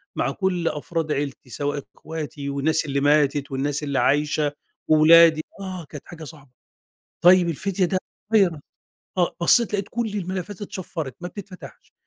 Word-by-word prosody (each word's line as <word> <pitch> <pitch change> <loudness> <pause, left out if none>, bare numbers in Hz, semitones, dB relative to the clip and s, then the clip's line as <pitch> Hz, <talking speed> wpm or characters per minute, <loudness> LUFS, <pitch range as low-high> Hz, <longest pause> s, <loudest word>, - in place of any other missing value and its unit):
مع - - 0
كُلّ 180 -3 -1
أفراد 155 +1 -2
عيلتي، 140 -3 -3
سواء 145 +2 -3
اخواتي 150 -3 -6
والناس 150 +3 0
اللي 140 -1 -1
ماتت 145 -1 +2
والناس 140 +2 -2
اللي 140 -2 -1
عايشة، 145 +3 +1 0.4
وولادي 160 +1 +7 0.2
آه 185 -3 -6
كانت 150 - -9
حاجة 165 -2 -10
صعبة، 145 -3 -12 0.7
طيب 180 0 +6
الفدية 185 +4 -1
ده 185 +2 0 0.4
virus 180 -7 +3 0.6
آه، 175 - +1
بصّيت 220 +6 +4
لقيت 200 -1 -2
كُلّ 235 -1 -2
الملفات 190 +1 -4
اتشفَّرِت 165 -8 -5
ما 175 - -5
بتتفتحش، 180 - -11
160 Hz, 145 wpm, -23 LUFS, 145-185 Hz, 0.7 s, وولادي